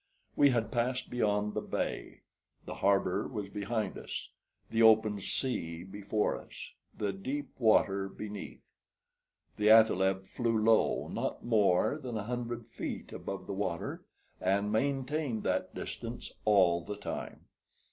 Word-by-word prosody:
We 145 -1 +6
had 115 -4 0
passed 125 +2 -1
beyond 105 -3 +1
the - - -1
bay; - - -4 0.4
the - - -5
harbor 95 -2 +2
was 105 -5 -5
behind 105 0 -2
us, - - -6 0.4
the 115 - +2
open 110 -2 +5
sea 85 -10 -2
before 100 +2 -1
us, - - -10 0.3
the 100 -2 -1
deep 135 +10 -4
water 100 -4 +3
beneath. 105 0 -7 0.9
The 105 0 +3
athaleb 95 -4 +5
flew 115 +3 0
low, 110 +1 +3
not - - -3
more 110 +4 +3
than 125 -5 -4
a 105 - -3
hundred 120 0 -4
feet - - -6
above 95 -2 -5
the 100 - -4
water, 95 -4 -3 0.4
and 100 +2 +1
maintained 135 0 0
that - - -1
distance - - -6
all 95 -5 +4
the 105 +4 -6
time. - - -6
105 Hz, 135 wpm, -31 LUFS, 100-120 Hz, 0.9 s, We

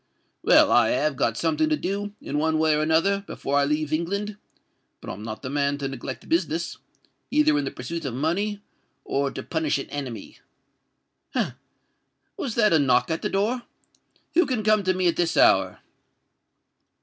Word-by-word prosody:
Well—I - - +5
have - - +1
got - - 0
something 315 0 +1
to 310 - +2
do, 205 -1 -3
in 145 - -2
one 160 +1 +1
way 160 0 +3
or 150 - +1
another, 165 +6 +2
before 140 +1 -1
I 140 - +3
leave 150 +1 -1
England; 200 +6 -2 0.6
but - - -7
I'm 95 - -8
not 110 +2 -7
the 130 - -4
man 140 0 0
to 140 -1 -3
neglect 130 0 -7
business—either 170 - -1
in 295 - 0
the - - -1
pursuit 170 0 -6
of 125 -3 -3
money 200 +9 -1 0.4
or 140 0 0
to - - -7
punish 160 -3 0
an 135 - -7
enemy. 130 -7 -6 1.0
Ha! - - 0
that - - -46
was 240 -5 -4
a 210 -8 +4
knock 140 +3 +2
at 160 - -1
the - - -1
door! 220 +6 0 0.7
who 350 +2 +4
can 245 -5 -1
come 215 0 +4
to 185 0 +2
me 185 0 0
at 170 - +1
this 170 -1 0
hour?" 95 -1 +4
165 Hz, 175 wpm, -25 LUFS, 140-205 Hz, 1.0 s, Well—I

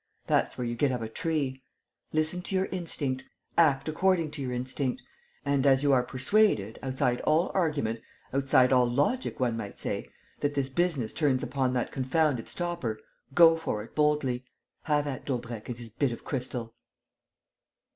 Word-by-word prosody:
That's - - +1
where 125 - -2
you 120 - -2
get 135 +3 +1
up 125 -2 -2
a - - -3
tree. 140 0 -2 0.5
Listen 155 +3 0
to 195 - -2
your 190 0 +2
instinct. 145 -7 -2 0.3
Act 145 -5 +4
according 165 0 +2
to 145 - -6
your 130 -2 -2
instinct. 130 +1 -2 0.5
And 140 -1 +2
as 135 0 +5
you 140 -1 +4
are 130 - +5
persuaded, 125 - +2
outside 130 -2 0
all 155 +3 +2
argument, 145 - 0 0.3
outside 135 -1 +4
all 125 -1 +4
logic, 145 - 0
one 120 -3 +1
might 105 -3 -6
say, - - -3 0.3
that 145 0 -1
this 135 -2 0
business 140 -6 0
turns 140 -5 +1
upon 130 0 0
that 125 -2 -1
confounded 135 -1 0
stopper, 170 -11 -3 0.4
go 165 -1 +8
for 135 -10 -3
it 115 - -14
boldly. 150 -5 +1 0.4
Have 150 -1 +2
at 135 -3 -4
Daubrecq 120 -4 -4
and 120 - -4
his 120 -2 -9
bit 135 +3 0
of 115 - -8
crystal!" 125 -3 -4
135 Hz, 165 wpm, -28 LUFS, 125-155 Hz, 0.5 s, go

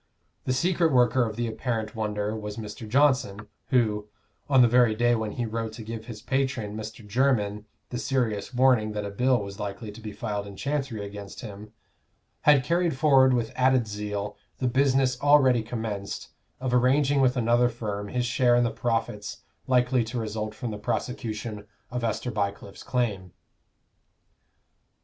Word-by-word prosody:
The 130 - +1
secret 170 +3 +2
worker 125 -1 +4
of 110 - -6
the 120 +1 -1
apparent 110 0 -3
wonder 105 -1 -2
was 105 -1 -6
Mr. 110 0 -7
Johnson, 130 -6 +2 0.2
who, 110 -5 +1 0.4
on 130 -3 +6
the - - +6
very 120 -2 +4
day 120 +2 +3
when 110 -2 -2
he 120 - -2
wrote 115 0 -3
to 115 - -8
give 110 0 -7
his 110 -3 -8
patron, 130 -5 -1
Mr. 110 0 -8
Jermyn, 105 -3 +1 0.3
the 125 - -3
serious 115 -7 -1
warning 125 -4 +3
that 105 -1 -3
a 100 - -5
bill 125 +2 +2
was 100 +1 -8
likely 105 +1 -5
to 105 - -12
be 110 -1 -6
filed 105 0 -4
in 100 - -9
Chancery 135 -5 -2
against 100 +1 -8
him, 105 -2 -9 0.7
had 145 -3 +5
carried 170 -1 +1
forward 135 -3 +5
with 115 -2 -1
added 130 -2 +3
zeal 105 -1 -4 0.2
the 130 - 0
business 130 0 +2
already 135 -4 +5
commenced, 110 -3 -5 0.3
of 130 -1 -2
arranging 135 +3 +3
with 130 0 +3
another 120 +1 +3
firm 105 -4 -4
his 125 +3 -1
share 120 0 +3
in 120 - +4
the 120 - +1
profits 115 -3 -3 0.2
likely 125 -1 +3
to 120 +3 -5
result 110 -1 -3
from 120 0 -4
the 105 - -6
prosecution 110 -2 -4 0.2
of 125 0 -3
Esther 115 +2 -1
Bycliffe's 100 -2 -3
claim. 105 -8 -2
115 Hz, 165 wpm, -26 LUFS, 105-130 Hz, 0.7 s, on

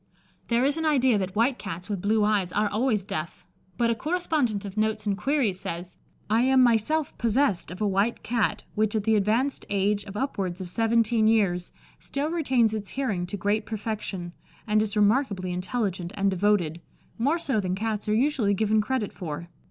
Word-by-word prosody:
There 240 +2 +2
is 285 +3 +1
an 320 - -1
idea 260 -7 +3
that 190 0 -3
white 240 +4 +2
Cats 180 -2 -6
with 200 -4 -3
blue 215 +2 +2
eyes 205 -4 +1
are 210 +1 +1
always 215 -1 0
deaf, 160 -4 -5 0.3
but 235 -1 +2
a - - +3
correspondent 295 - -1
of 195 -1 -7
Notes 215 0 0
and 200 -1 +1
Queries 225 -4 0
says, 175 -2 -6 0.3
"I 220 +3 +3
am 260 0 +5
myself 245 +7 +2
possessed 230 - +1
of 180 +4 -8
a 210 - +2
white 200 +4 0
Cat 230 -3 0
which, 215 0 0
at 215 - 0
the 220 +1 +3
advanced 225 +7 +1
age 200 +1 +1
of 200 0 -7
upwards 195 -9 -2
of 185 -2 -5
seventeen 225 +1 +2
years, 195 -6 +2 0.3
still 285 +3 -3
retains 260 -9 +2
its 205 -3 -4
hearing 205 -10 -2
to 205 - -5
great 205 +3 0
perfection, 210 -5 -4 0.3
and 215 -1 +2
is 215 0 -2
remarkably 205 -4 +2
intelligent 185 -2 -2
and 195 0 +1
devoted, 180 -4 +1 0.4
more 285 +8 +2
so 280 -9 0
than 185 -2 -1
Cats 215 +1 -2
are 210 - +3
usually 235 -5 +2
given 215 +1 +2
credit 240 -2 -2
for. 170 0 -6
215 Hz, 185 wpm, -26 LUFS, 195-235 Hz, 0.4 s, am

